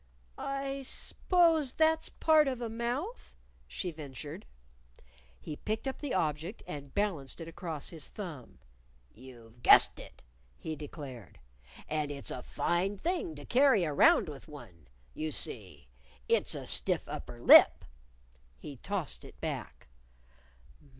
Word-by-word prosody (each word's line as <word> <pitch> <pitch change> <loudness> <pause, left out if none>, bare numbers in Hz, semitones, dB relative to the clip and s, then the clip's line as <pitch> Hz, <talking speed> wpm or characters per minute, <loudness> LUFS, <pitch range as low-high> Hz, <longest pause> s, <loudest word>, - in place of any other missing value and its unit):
"I 275 0 -4
s'pose 325 +1 +1
that's 320 0 +2
part 310 -2 +4
of 260 -3 -2
a 235 -2 -4
mouth?" 245 - -4 0.3
she 180 - -4
ventured. 150 +3 -8 0.9
He 150 - -7
picked 220 +5 -3
up 265 - -3
the 290 -7 -3
object 160 +4 -2
and 140 -2 -8
balanced 180 -11 -1
it 165 - -7
across 165 -3 -5
his 160 -5 -6
thumb. 165 - -9 0.6
"You've 120 -1 -15
guessed - - +7
it!" - - -13 0.3
he 155 - -5
declared. 140 - -9 0.5
"And 150 -1 -1
it's 140 -1 -4
a 125 - -5
fine 185 +9 -1
thing 335 - -2
to 145 -1 -10
carry 255 -7 +4
around 150 +1 +4
with 145 -3 -9
one. 110 - -13 0.3
You 155 0 -3
see, 100 - -5 0.4
it's - - +2
a - - -6
stiff - - +3
upper - - -7
lip." - - +8 0.7
He 140 - -9
tossed 185 0 -3
it - - -14
back. - - -5
165 Hz, 130 wpm, -31 LUFS, -, 0.9 s, lip